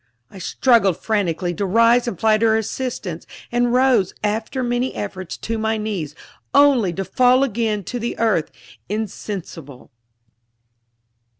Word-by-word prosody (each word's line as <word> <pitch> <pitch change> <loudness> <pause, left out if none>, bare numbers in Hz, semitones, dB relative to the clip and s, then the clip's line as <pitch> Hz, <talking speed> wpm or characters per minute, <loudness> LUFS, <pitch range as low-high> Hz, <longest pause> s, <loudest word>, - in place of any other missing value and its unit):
I 195 - -11
struggled 200 -1 +2
frantically 180 -5 -1
to 200 - -3
rise 230 +5 +4
and 195 -8 -4
fly 215 -1 +3
to 230 - +2
her 220 0 +3
assistance, 220 -6 -4 0.2
and 240 0 +1
rose, 250 -6 +3
after 220 +5 -2
many 245 +1 -1
efforts, 185 -3 -5
to 225 0 -4
my 220 0 0
knees, 195 -9 -4 0.4
only 275 -9 +5
to 195 +2 -4
fall 250 +7 +3
again 220 -4 -1
to 245 +7 -5
the 235 +1 -4
earth, 215 -9 +1 0.4
insensible. 190 - -6
220 Hz, 135 wpm, -21 LUFS, 190-240 Hz, 0.4 s, only